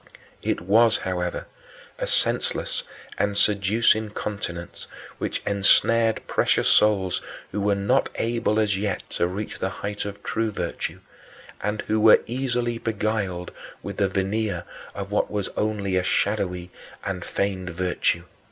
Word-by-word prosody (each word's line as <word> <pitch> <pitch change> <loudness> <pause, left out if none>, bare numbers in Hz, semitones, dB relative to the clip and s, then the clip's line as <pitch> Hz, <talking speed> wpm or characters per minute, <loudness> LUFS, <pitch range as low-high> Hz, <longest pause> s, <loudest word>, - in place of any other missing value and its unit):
It - - -1
was, 110 +5 +5
however, 90 -1 -3 0.5
a - - -1
senseless - - +1 0.4
and 100 0 +1
seducing 105 +2 +3
continence, 100 -5 -5 0.3
which - - -2
ensnared 110 +3 +3
precious - - +2
souls 100 -4 +4 0.3
who 105 - -2
were 100 0 +2
not 100 +7 +2
able 115 -2 0
as 105 -2 +2
yet 100 -1 -2
to 85 - +1
reach 100 +4 -5
the 95 - 0
height 100 +1 -4
of 100 0 -7
true 115 0 0
virtue, 90 -5 -4 0.6
and 105 +1 -2
who 110 0 0
were 110 0 +7
easily 120 -2 -1
beguiled 105 -5 -2 0.3
with 100 +2 -6
the 100 - +3
veneer 95 -1 -1 0.3
of 100 0 -5
what 105 - +1
was 105 -2 -2
onl 100 -3 0
105 Hz, 120 wpm, -25 LUFS, 95-110 Hz, 0.6 s, were